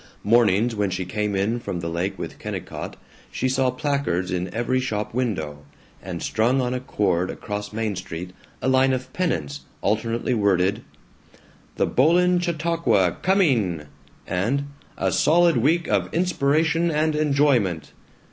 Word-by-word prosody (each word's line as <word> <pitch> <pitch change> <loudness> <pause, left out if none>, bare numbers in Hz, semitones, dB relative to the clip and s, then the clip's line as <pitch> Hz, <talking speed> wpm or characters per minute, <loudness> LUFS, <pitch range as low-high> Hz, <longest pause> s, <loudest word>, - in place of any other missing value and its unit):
Mornings 115 +1 +3
when 105 -2 0
she 95 0 -3
came 105 +1 -2
in 105 +5 0
from 100 -6 -4
the 85 - -4
lake 90 +4 -2
with - - -7
Kennicott - - -6 0.4
she 130 - -1
saw 130 0 +2
placards 125 - -1
in 90 0 -2
every 120 +3 0
shop 110 -5 -3
window, 90 - -2 0.4
and - - -6
strung 120 +4 +1
on 125 -1 0
a 125 - -1
cord 95 -7 0
across 105 0 -5
Main 110 -1 -2
Street, 90 -1 -6 0.3
a - - +1
line 130 0 +4
of 130 0 -4
pennants 75 - -2 0.2
alternately 115 +4 0
worded 100 -4 +2 0.9
"The - - +2
Boland 175 +5 +3
Chautauqua 165 - +1
COMING!" 125 - +2 0.4
and 115 +10 0 0.3
"A - - 0
solid 170 -1 +4
week 160 +8 +2
of 95 -4 0
inspiration 165 0 +1
and 155 0 +1
enjoyment!" 140 - +1
115 Hz, 140 wpm, -23 LUFS, 95-140 Hz, 0.9 s, line